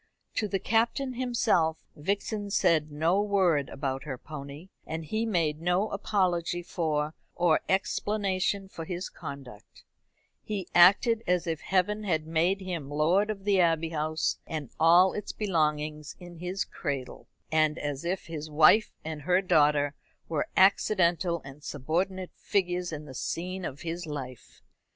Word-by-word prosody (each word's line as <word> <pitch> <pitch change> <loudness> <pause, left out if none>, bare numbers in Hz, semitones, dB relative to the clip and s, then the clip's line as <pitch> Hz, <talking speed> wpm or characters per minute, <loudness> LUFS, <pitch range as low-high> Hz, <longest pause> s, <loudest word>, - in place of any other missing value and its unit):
To 215 - +1
the 195 - 0
Captain 230 +6 0
himself 230 -10 +1
Vixen 205 +5 -2
said 165 -6 +2
no 165 +7 +2
word 185 -9 +2
about 135 -1 -3
her 135 -4 -4
pony, 145 +4 -9 0.2
and 160 0 -4
he 220 +8 -1
made 165 -7 0
no 180 +5 +1
apology 180 -4 0
for 155 -3 -1 0.2
or 170 -2 +3
explanation 195 0 0
of 165 -1 -6
his 180 0 -4
conduct, 130 -7 -10 0.6
He 200 -4 -4
acted 205 +6 +6
as 180 -1 +2
if 160 -2 -2
Heaven 200 +3 0
had 160 -6 0
made 170 +5 +1
him 170 -7 -5
lord 170 +8 +2
of 200 -2 -4
the 200 -1 +3
Abbey 165 -2 +2
House 155 0 -1
and 150 -6 -5
all 175 +4 +6
its 210 - -4
belongings 150 -6 -1
in 175 -1 -11
his 180 +3 -2
cradle, 140 -5 -5 0.2
and 155 0 +3
as 145 -1 -4
if 180 +2 -2
his 155 -2 -6
wife 155 +8 +5
and 155 -1 -5
her 180 +4 +3
daughter 150 -5 +3 0.3
were 160 -3 -1
accidental 175 -3 +3
and 135 +2 -11
subordinate 180 +7 -2
figures 180 -2 -1
in 150 -1 -6
the 135 - -10
scene 185 +8 -4
of 140 -4 -5
his 170 0 -4
life. 130 -5 -8
170 Hz, 145 wpm, -28 LUFS, 150-195 Hz, 0.6 s, acted